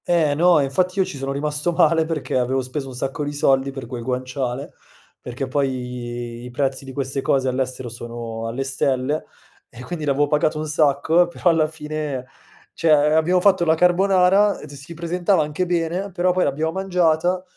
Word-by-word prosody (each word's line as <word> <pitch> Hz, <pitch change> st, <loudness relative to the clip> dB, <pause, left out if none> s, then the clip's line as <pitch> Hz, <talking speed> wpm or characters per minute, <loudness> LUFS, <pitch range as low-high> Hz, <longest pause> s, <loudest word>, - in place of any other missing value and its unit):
Eh, 165 Hz, -4 st, +3 dB
no, 170 Hz, +2 st, +4 dB
e -, -, +2 dB
infatti 180 Hz, +8 st, 0 dB
io 190 Hz, -, +3 dB
ci 185 Hz, -, -7 dB
sono 135 Hz, 0 st, -3 dB
rimasto 150 Hz, +4 st, -1 dB
male 165 Hz, -1 st, +3 dB
perché 160 Hz, -3 st, -3 dB
avevo 130 Hz, +1 st, +1 dB
speso 135 Hz, +2 st, -5 dB
un 130 Hz, -, -9 dB
sacco 135 Hz, +3 st, -3 dB
di 145 Hz, -, -3 dB
soldi 135 Hz, -2 st, +2 dB
per 135 Hz, -2 st, -7 dB
quel 120 Hz, 0 st, -6 dB
guanciale, 130 Hz, +1 st, -3 dB, 0.5 s
perché 125 Hz, +2 st, -5 dB
poi 125 Hz, -3 st, -3 dB
i 125 Hz, -, -8 dB
prezzi 135 Hz, +1 st, -2 dB
di 135 Hz, -, -8 dB
queste 135 Hz, 0 st, -3 dB
cose 135 Hz, 0 st, +1 dB
all'estero 130 Hz, 0 st, -2 dB
sono 115 Hz, -1 st, -6 dB
alle 120 Hz, +4 st, -3 dB
stelle 135 Hz, +1 st, -1 dB, 0.4 s
e 120 Hz, +2 st, -11 dB
quindi 165 Hz, +3 st, -5 dB
l'avevo 145 Hz, 0 st, +2 dB
pagato 150 Hz, +1 st, +1 dB
un 155 Hz, -, -3 dB
sacco, 155 Hz, +3 st, +3 dB
però 175 Hz, 0 st, +1 dB
alla 160 Hz, -2 st, +2 dB
fine 150 Hz, -4 st, -5 dB, 0.5 s
cioè, 165 Hz, -, 0 dB, 0.2 s
abbiamo 165 Hz, +3 st, +3 dB
fatto 190 Hz, -2 st, +4 dB
la 160 Hz, -1 st, +3 dB
carbonara, 190 Hz, +3 st, +3 dB
d 145 Hz, -, -12 dB
si 145 Hz, +4 st, -10 dB
presentava 175 Hz, +2 st, +1 dB
anche 150 Hz, +5 st, -2 dB
bene, 175 Hz, +3 st, -1 dB
però 180 Hz, 0 st, +1 dB
poi 180 Hz, 0 st, +1 dB
l'abbiamo 155 Hz, +4 st, -1 dB
mangiata 180 Hz, -1 st, +1 dB
145 Hz, 180 wpm, -21 LUFS, 130-170 Hz, 0.5 s, no